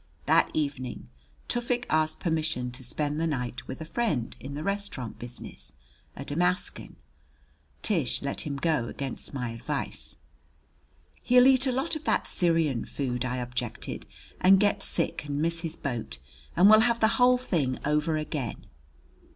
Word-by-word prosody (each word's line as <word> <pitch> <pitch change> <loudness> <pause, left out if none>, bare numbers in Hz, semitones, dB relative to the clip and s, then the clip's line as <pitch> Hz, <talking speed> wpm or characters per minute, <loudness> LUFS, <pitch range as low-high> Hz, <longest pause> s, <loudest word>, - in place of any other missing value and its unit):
That - - +4
evening 130 - -3 0.4
Tufik 240 0 -1
asked 155 0 +2
permission 155 -7 -1
to 130 +2 -8
spend 150 +4 -1
the 165 - +1
night 125 -5 -3
with 130 - -6
a - - -4
friend 155 - -1
in 140 +1 -7
the 150 - -4
restaurant 200 - -3
business 120 0 -8 0.4
a 140 - -7
Damascan. 180 +6 0 0.9
Tish 165 - +1
let 140 - -2
him 145 -2 -3
go 145 -4 +1
against 135 +1 -5
my 125 -3 -2
advice. 115 - -3 1.0
"He'll 250 0 +6
eat 265 0 +6
a - - +3
lot 270 +6 0
of 310 - -5
that - - +2
Syrian 165 -8 +2
food," 125 -3 -2
I 125 0 -2
objected, 125 -1 -4 0.3
"and 190 +1 +7
get 205 0 +2
sick 170 -6 -1
and 145 -1 -2
miss 165 +2 +1
his 165 -1 -4
boat, 115 - -4 0.4
and 185 - +7
we'll 215 +1 +9
have 235 +1 +3
the 220 - +5
whole 250 0 +7
thing 155 - 0
over 150 +2 +1
again!" 150 -6 -4
155 Hz, 155 wpm, -28 LUFS, 130-195 Hz, 1.0 s, we'll